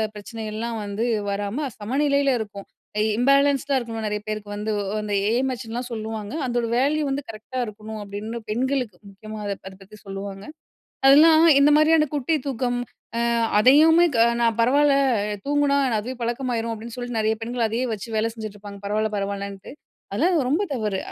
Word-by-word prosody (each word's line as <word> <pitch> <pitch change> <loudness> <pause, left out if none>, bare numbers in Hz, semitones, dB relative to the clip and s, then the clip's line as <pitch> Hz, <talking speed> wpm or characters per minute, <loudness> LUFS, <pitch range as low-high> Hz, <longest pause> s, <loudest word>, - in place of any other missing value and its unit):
பிரச்சனைகள்லாம் 225 +1 -5
வந்து 205 +4 -2 0.2
வராம 205 +9 -2
சமநிலையில 280 +4 +1
இருக்கும். 200 -2 -7 0.5
இம்பேலன்ஸ்டா 275 +1 +3
இருக்கணும். 225 -3 -4
நிறைய 210 0 -2
பேருக்கு 215 -1 -4
வந்து 210 +1 -3 0.3
அந்த 210 -1 -4 0.2
ஏ.எம்.எச். 255 +1 -1
லாம் 245 0 -4
சொல்லுவாங்க. 220 0 -5
அதோட 240 -1 0
வேல்யூ 295 +4 +2
வந்து 275 +1 -2
கரெக்ட்டா 225 +4 -9
இருக்கணும். 215 +1 -8
அப்படின்னு 205 +3 -6
பெண்களுக்கு 250 -3 -1 0.2
முக்கியமா 215 +2 -9
அத 200 -1 -2
அத 190 - -9
பத்தி 210 +2 -14
சொல்லுவாங்க. 195 0 -7 0.6
அதெல்லாம் 315 +3 +7 0.2
இந்த 290 +1 +6
மாதிரியான 310 0 +5
குட்டி 290 +3 0
தூக்கம். 245 -2 -1 0.4
அ - - 0 0.4
அதையுமே 315 +8 +6
க 230 - +1 0.2
நான் 230 -1 +2
பரவாயில்ல 280 +4 +4 0.5
தூங்கினா 290 -1 +2 0.2
அதுவே 245 +5 -4
பழக்கமாரும் 235 -1 -2
அப்படின்னு 225 +1 -7
சொல்லிட்டு 245 -2 -4
நிறைய 220 +1 +2
பெண்கள் 235 0 -1
அதையே 235 +4 -1
வச்சு 215 +2 -5
வேலை 220 +1 +1
செஞ்சுட்டுருப்பாங்க. 205 -2 -8
பரவாயில்ல, 215 +1 0
பரவாயில்லன்ட்டு. 200 -1 -4 0.4
அதெல்லாம் 355 0 +2
ரொம்ப 320 +9 +2
தவறு. 210 -5 -2
230 Hz, 150 wpm, -23 LUFS, 210-270 Hz, 0.6 s, அதெல்லாம்